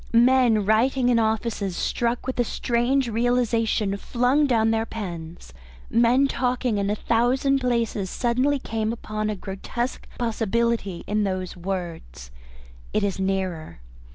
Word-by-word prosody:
Men 240 -3 +4
writing 245 +4 +3
in 240 -2 +4
offices, 220 -4 -1
struck 240 0 -1
with 260 -1 -4
a - - +5
strange 240 +3 0
realisation, 230 -3 +1
flung 250 +7 +1
down 225 -3 +3
their 225 0 0
pens, 170 - -7 0.4
men 240 +4 +4
talking 250 -4 0
in 200 0 0
a 210 - +1
thousand 250 +5 +1
places 235 -6 -1
suddenly 255 +6 +1
came 220 -4 -2
upon 215 -2 -3
a 210 - -2
grotesque 200 +6 -5
possibility 230 -4 -1
in 210 0 0
those 185 -2 -3
words, 170 - -6 0.6
"It - - +1
is 195 -1 -1
nearer." 185 - -2
225 Hz, 130 wpm, -24 LUFS, 195-245 Hz, 0.6 s, a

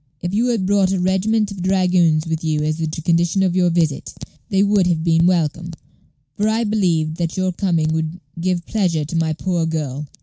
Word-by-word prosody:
If 175 +1 -4
you 230 +4 +1
had 230 -6 0
brought 195 -1 +2
a 190 - 0
regiment 200 +4 +1
of 195 -2 -7
dragoons 180 -4 +2
with 160 0 -3
you 155 -2 0
as 155 +1 -1
the 160 -1 -2
condition 170 +4 0
of 185 -2 +1
your 180 -1 +3
visit, 165 -4 -1 0.4
they 195 -2 +2
would 200 -3 +3
have 165 -3 0
been 165 0 +3
welcome, 170 -1 0 0.6
for 210 - 0
I 225 +2 +1
believed 170 -7 0
that 170 0 -3
your 185 0 0
coming 170 -4 0
would 160 +2 -3 0.2
give 175 -1 -1
pleasure 175 -8 0
to 155 - -6
my 165 -1 +1
poor 170 0 -1
girl. 150 -3 -3
175 Hz, 200 wpm, -19 LUFS, 160-190 Hz, 0.6 s, your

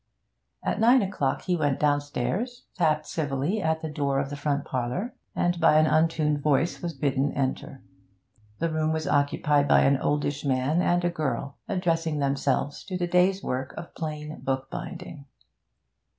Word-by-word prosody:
At - - -1
nine 240 +2 +5
o'clock 165 -9 -1
he 180 - +1
went 145 -5 0
downstairs, 150 - -1
tapped 155 -4 +1
civilly 150 +6 -1
at 160 -2 0
the - - -1
door 140 -2 -1
of 135 0 -3
the - - -3
front 140 0 -1
parlour, 130 - -2 0.2
and 175 -1 +1
by 160 -2 +5
an 155 - +5
untuned 155 -2 +2
voice 150 +3 +1
was 170 -3 -4
bidden 140 0 0
enter. 135 0 -3 0.7
The 165 0 -1
room 155 0 0
was 160 -1 -2
occupied 145 0 +2
by - - +5
an 135 0 +4
oldish 145 0 -1
man 140 +4 +1
and 175 0 +2
a 175 - +2
girl, 140 -4 -3
addressing 165 -5 0
themselves 140 0 0
to 185 -1 -3
the 175 - 0
day's 180 +2 +2
work 130 +1 -3
of 170 - -8
plain 155 -1 -5
bookbinding. 135 +2 -5
150 Hz, 160 wpm, -26 LUFS, 140-170 Hz, 0.7 s, nine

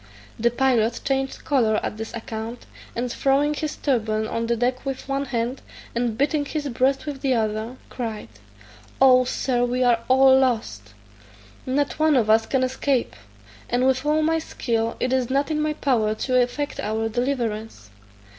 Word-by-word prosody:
The 235 +2 +3
pilot 240 -2 +1
changed 270 -1 -2
colour 230 -7 +2
at 210 - -3
this 225 0 -6
account, 225 +1 -6 0.3
and 240 +1 -2
throwing 280 +4 +2
his 305 0 -3
turban 220 -5 0
on 230 +1 -2
the 235 - +1
deck 250 +2 -1
with 270 -1 -5
one 275 +1 -1
hand, 240 +1 -2 0.3
and 235 -2 -1
beating 290 +2 +1
his 295 0 -3
breast 270 +3 +1
with 285 -3 -5
the 265 -3 +2
other, 220 +2 -2
cried, 220 - -5 0.7
"Oh, 255 -1 +6
Sir, 245 -1 0
we 250 +1 +1
are 240 -2 +4
all 265 0 +6
lost; 110 - -1 0.7
not 285 +3 0
one 310 -1 +4
of 220 -4 +3
us 220 0 +4
can 265 -1 +1
escape; 255 - 0 0.5
and 245 +1 +1
with 260 0 +2
all 305 +1 +2
my 325 +1 +2
skill 230 -7 -2
it 255 +1 0
is 255 -2 +1
not 280 +3 0
in 305 0 0
my 305 0 0
power 225 -8 +1
to 255 +3 -2
effect 285 +4 -2
our 220 +1 -1
deliverance." 225 - -3
250 Hz, 170 wpm, -23 LUFS, 225-270 Hz, 0.7 s, Oh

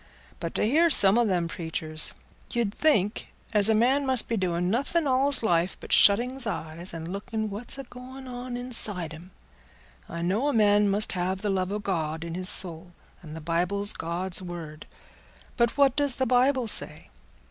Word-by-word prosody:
But 165 - -6
t' - - +2
hear 325 +8 +3
some 200 -9 +6
o' 240 - +2
them 180 -5 -1
preachers, 160 -2 -4 0.4
you'd 235 -5 -2
think 215 -10 0 0.2
as 210 0 +7
a 220 - +3
man 260 +6 +2
must 260 -4 +4
be 230 - -2
doing 180 -3 -2
nothing 280 +8 0
all's 270 0 +1
life 175 -3 0
but - - -5
shutting's 245 +5 +4
eyes 170 -2 -5
and 165 +2 -7
looking 220 +1 -5
what's 220 +6 -2
agoing 260 0 -11
on 245 0 -7
inside 215 -9 0
him. 170 +4 -13 0.8
I 170 - -6
know 205 +11 -1
a 290 - 0
man 205 -2 +3
must 205 +2 +2
have 185 +2 -3
the 205 - -1
love 190 0 -2
o' 205 - -2
God 160 -6 -4
in 170 -1 -7
his 185 +1 +1
soul, 175 -1 0 0.3
and 155 -3 -11
the 160 - -8
Bible's 180 +6 -1
God's 175 +2 -1
word. 170 -4 -9 0.7
But 235 +1 0
what 275 -2 +3
does 285 -3 +1
the 260 - -1
Bible 255 0 +1
say? - - -2
205 Hz, 180 wpm, -25 LUFS, 175-245 Hz, 0.8 s, as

